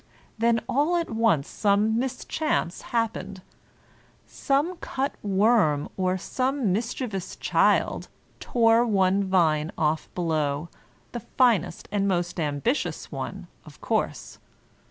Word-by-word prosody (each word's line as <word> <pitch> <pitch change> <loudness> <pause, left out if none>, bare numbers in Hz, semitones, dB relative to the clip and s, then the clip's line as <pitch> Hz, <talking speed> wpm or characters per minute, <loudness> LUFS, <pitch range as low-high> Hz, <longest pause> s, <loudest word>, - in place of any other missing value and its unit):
Then 230 0 +2
all 295 +7 +1
at 340 -5 -1
once 220 -11 +2
some 210 +2 +1
mischance 265 - -2
happened, 200 -5 -2 0.5
— - - -32
some 295 +6 -1
cut 275 -4 -3
worm 195 -7 +2
or 185 0 0
some 255 0 -1
mischievous 225 -2 -3
child - - +1 0.3
tore 230 -1 +3
one 195 -3 +2
vine 165 -4 +2
off 155 -1 0
below, 155 -2 -1 0.4
the 240 - -4
finest 235 -6 +1
and 200 -1 +1
most 175 -2 -1
ambitious 155 - -2
one, - - -5 0.2
of - - -15
course. - - -2
205 Hz, 115 wpm, -25 LUFS, 175-240 Hz, 0.5 s, tore